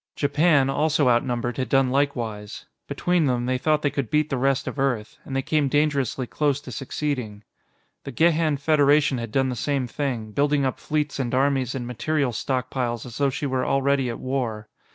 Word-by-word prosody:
Japan, 145 -1 +3
also 145 0 +2
outnumbered, 120 0 0
had 130 -3 -2
done 135 -1 +3
likewise. 120 -7 -2 0.2
Between 175 -3 +1
them, 125 -2 0
they 130 0 0
thought 155 +2 +1
they 145 - +1
could 135 -6 -3
beat 150 0 +1
the - - +1
rest 135 +1 +1
of - - -4
Earth. 125 -6 -1
And 135 - -6
they 135 - 0
came 150 -1 +1
dangerously 140 -3 0
close 145 +2 0
to 130 - -9
succeeding. 125 -4 -4 0.6
The 140 - -6
Gehan 160 +1 +2
Federation 145 -2 +3
had 115 -2 -5
done 135 +2 +1
the 125 - -3
same 140 +1 -1
thing, 120 -3 -3
building 145 +3 +1
up 130 - -2
fleets 150 -2 -2
and 125 -2 -1
armies 135 -2 +1
and 125 -2 -4
material 130 +3 -1
stockpiles 125 -1 -2
as 120 0 -8
though 140 -1 +3
she 140 +2 -4
were 130 -2 0
already 135 -1 +1
at 115 - -4
war. 120 -5 -3
135 Hz, 190 wpm, -24 LUFS, 125-145 Hz, 0.6 s, Japan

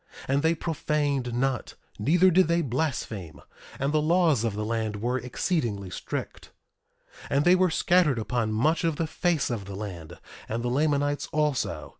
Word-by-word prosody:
And 135 +1 +2
they 160 +2 +2
profaned 145 -5 -1
not; 130 0 -1 0.2
neither 175 - +4
did 185 0 +4
they 170 0 +2
blaspheme. 115 - -3 0.4
And 140 +2 -1
the 155 - +3
laws 160 -6 +3
of 115 -3 -1
the 105 0 -3
land 110 -1 -2
were 120 +5 -1
exceedingly 120 - -2
strict. - - -6 0.8
1:6 - - -10
And 140 +2 +2
they 175 - +7
were 185 0 +3
scattered 165 -4 +3
upon 115 0 -1
much 155 +11 +1
of 165 -2 +1
the 165 - -1
face 160 -3 0
of 105 -5 -3
the 100 0 -7
land, 95 -6 -7 0.3
and 115 +2 -2
the 125 - 0
Lamanites 145 +1 +1
also. 150 -4 -1
140 Hz, 170 wpm, -27 LUFS, 115-160 Hz, 0.8 s, they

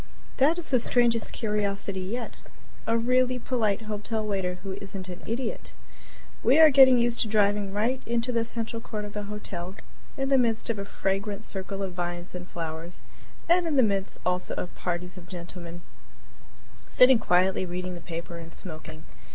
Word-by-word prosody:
That 295 +5 +4
is 345 -4 -3
the 255 - +5
strangest 235 -1 +2
curiosity 200 -3 -1
yet 225 +6 -4 0.5
a 230 0 +3
really 255 +2 +2
polite 225 -4 0
hotel 215 +1 -3
waiter 190 -3 -1
who 195 - -4
isn't 195 -2 -6
an 180 - -7
idiot. 230 +1 -3 0.7
We 260 +5 +5
are 315 -1 +9
getting 260 -2 +8
used 240 0 +1
to - - +2
driving 205 -1 +2
right 230 +6 0
into 235 +1 0
the 230 -1 +1
central 230 0 -4
court 210 -2 -5
of 205 - -8
the 210 - -3
hotel, 190 -3 -5 0.4
in 270 0 -1
the 270 -1 +5
midst 230 -1 +1
of 215 - -4
a 200 - -4
fragrant 200 +2 -2
circle 195 -1 -4
of 190 -2 -4
vines 175 0 -4
and 180 0 -7
flowers, 165 +1 -6 0.5
and 345 0 +4
in 310 - 0
the 260 - +6
midst 195 -3 0
also 180 0 0
of 180 - -4
parties 180 +1 -4
of 175 - -12
gentlemen 175 -1 -8 1.1
sitting 250 -1 +6
quietly 185 -1 +2
reading 180 +1 -4
the 175 - -8
paper 170 0 -6
and 165 0 -10
smoking. 160 -3 -8
205 Hz, 175 wpm, -27 LUFS, 180-235 Hz, 1.1 s, are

